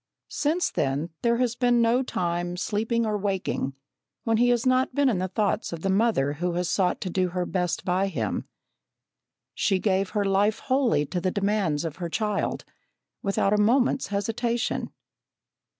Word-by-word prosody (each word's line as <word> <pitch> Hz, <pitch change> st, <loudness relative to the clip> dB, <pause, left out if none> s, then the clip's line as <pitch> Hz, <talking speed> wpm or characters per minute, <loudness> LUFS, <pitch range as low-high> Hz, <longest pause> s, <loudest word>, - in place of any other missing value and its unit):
Since 320 Hz, +4 st, 0 dB
then 140 Hz, +5 st, -1 dB
there 235 Hz, 0 st, +2 dB
has 245 Hz, -2 st, +1 dB
been 245 Hz, -1 st, +3 dB
no 235 Hz, +2 st, +3 dB
time, 175 Hz, -6 st, -2 dB
sleeping 225 Hz, +4 st, 0 dB
or 210 Hz, -1 st, -1 dB
waking, 190 Hz, -8 st, -2 dB, 0.5 s
when 225 Hz, -1 st, +2 dB
he 245 Hz, +2 st, +4 dB
has 240 Hz, 0 st, +2 dB
not 255 Hz, 0 st, +2 dB
been 285 Hz, -2 st, +3 dB
in 205 Hz, -7 st, 0 dB
the 185 Hz, -, -1 dB
thoughts 205 Hz, +3 st, -1 dB
of 170 Hz, -2 st, -6 dB
the 195 Hz, -, +1 dB
mother 195 Hz, -9 st, +2 dB
who 175 Hz, +3 st, -2 dB
has 175 Hz, 0 st, -1 dB
sought 180 Hz, -1 st, +1 dB
to 190 Hz, -, -3 dB
do 185 Hz, +1 st, +1 dB
her 180 Hz, 0 st, -2 dB
best 180 Hz, -2 st, -2 dB
by 185 Hz, +2 st, +1 dB
him. 120 Hz, -, -2 dB, 1.1 s
She 195 Hz, -, +1 dB
gave 190 Hz, 0 st, +1 dB
her 205 Hz, -, +2 dB
life 200 Hz, +2 st, +2 dB
wholly 255 Hz, -, +1 dB
to 175 Hz, +5 st, -3 dB
the 185 Hz, -, +1 dB
demands 195 Hz, -6 st, 0 dB
of 160 Hz, -2 st, -5 dB
her 175 Hz, -2 st, -4 dB
child, 210 Hz, +3 st, -1 dB, 0.6 s
without 195 Hz, 0 st, +1 dB
a 210 Hz, -, +3 dB
moment's 250 Hz, +4 st, +2 dB
hesitation. 230 Hz, +4 st, -1 dB
200 Hz, 170 wpm, -26 LUFS, 180-235 Hz, 1.1 s, he